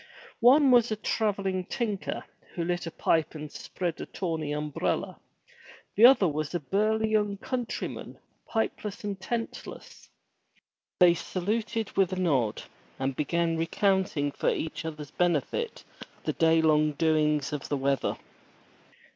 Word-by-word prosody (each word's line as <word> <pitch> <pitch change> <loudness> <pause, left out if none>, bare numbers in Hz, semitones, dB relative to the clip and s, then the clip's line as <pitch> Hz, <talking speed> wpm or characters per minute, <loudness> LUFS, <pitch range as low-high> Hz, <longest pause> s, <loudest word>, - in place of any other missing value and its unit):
One 265 +3 +6
was 240 -2 +5
a - - +1
travel 210 -1 -1
ling 185 -1 -1
tinker, 210 -3 -3 0.3
who 170 - -1
lit 175 0 -2
a - - -4
pipe 160 0 +1
and 150 -1 -7
spread 175 -3 -4
a - - -6
tawny 160 -5 -3
umbrella. 150 -1 -2 0.8
The 225 +4 +9
other 250 -8 +5
was 155 +1 -2
a - - +1
burly 215 +7 +1
young 210 -2 +1
countryman, 245 +2 -4 0.3
pipeless 220 -2 -2
and 200 -2 -4
tentless. 230 +3 -6 0.9
They 180 -2 +7
saluted 215 +5 -2
with 195 -2 +3
a 185 - -2
nod, 135 -12 +1 0.3
and 135 0 -2
began 165 +3 0
recounting 165 -3 +1
for - - 0
each 160 +1 -3
other's 150 -3 -6
benefit 180 - -1 0.4
the - - -1
day 165 0 +3
long 155 -1 +3
doings 150 -1 +1
of 145 - -4
the 145 - 0
weather. 135 0 0
175 Hz, 140 wpm, -28 LUFS, 155-210 Hz, 0.9 s, The